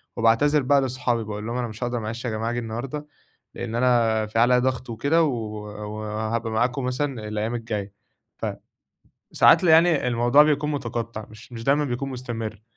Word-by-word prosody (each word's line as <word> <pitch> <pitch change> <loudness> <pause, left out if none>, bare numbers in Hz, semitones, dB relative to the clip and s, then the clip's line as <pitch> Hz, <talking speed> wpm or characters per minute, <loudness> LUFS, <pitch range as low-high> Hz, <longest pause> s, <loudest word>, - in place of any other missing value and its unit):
وباعتذر 120 +6 +3
بقى 140 +2 +3
لأصحابي، 125 -3 -1
باقول 105 0 -6
لهم 120 +1 -3
أنا 125 -1 -1
مش 110 +2 -7
هاقدر 120 0 -1
معلش 115 +3 -5
يا - - 0
جماعة 110 +1 -2
اجي 120 - -2
النهاردة، 125 +6 -5 0.5
لأن 115 -1 -5
أنا 115 -3 +2
في 110 +1 -2
عليّا 125 +1 +5
ضغط 130 0 -1
وكده، 140 +9 +2
و 155 - +2 0.7
وهابقى 110 +2 -3
معاكم 125 +4 0
مثلًا 130 -3 -2
الأيام 105 +2 -2
الجاية، 105 -4 -4 1.4
فساعات - - +6
ال - - +3
يعني 160 -3 +5
الموضوع 120 +4 +5
بيكون 150 0 +1
مُتقطّع 115 -5 -4
مش 110 +3 -14
مش 115 -1 -7
دايمًا 145 +3 +3
بيكون 135 0 -3
مستمر. 115 -4 -5
120 Hz, 170 wpm, -24 LUFS, 110-130 Hz, 1.4 s, فساعات